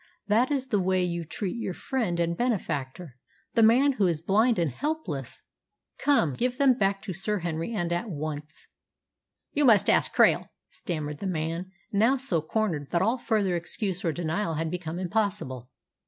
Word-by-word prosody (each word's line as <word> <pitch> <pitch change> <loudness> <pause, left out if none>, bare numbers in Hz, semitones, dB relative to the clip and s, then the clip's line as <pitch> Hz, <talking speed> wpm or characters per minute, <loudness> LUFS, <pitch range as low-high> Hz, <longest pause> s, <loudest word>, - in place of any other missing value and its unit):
That 225 +5 +3
is 265 -3 -1
the 210 -5 +2
way 185 0 +2
you 170 -1 -2
treat 190 +6 -4
your 190 -6 -3
friend 220 -11 -2
and 170 0 +1
benefactor, 165 - -2 0.4
the 230 - +3
man 245 +6 +6
who 210 -8 +1
is 165 -3 0
blind 215 +8 +2
and 165 -5 +1
helpless! 175 - -4 0.6
Come, 220 - +3
give 250 - -1
them 275 -2 +5
back 195 -3 0
to 200 -4 -4
Sir 210 +4 -1
Henry, 165 +3 -3
and 175 -4 -1
at 175 +6 -2
once." 155 -1 -6 0.9
"You 295 - +2
must 225 -7 +5
ask - - +2
Krail," - - +4 0.2
stammered 150 -4 -4
the 200 - -3
man, 165 +1 -3 0.2
now 225 +7 +3
so 210 - 0
cornered 160 - -2
that 170 +4 +1
all 230 +5 +1
further 205 -7 +1
excuse 185 +2 -2
or 165 - +1
denial 165 +2 -2
had 160 +1 -2
become 175 -2 -4
impossible. 180 - -2
185 Hz, 170 wpm, -27 LUFS, 165-220 Hz, 0.9 s, man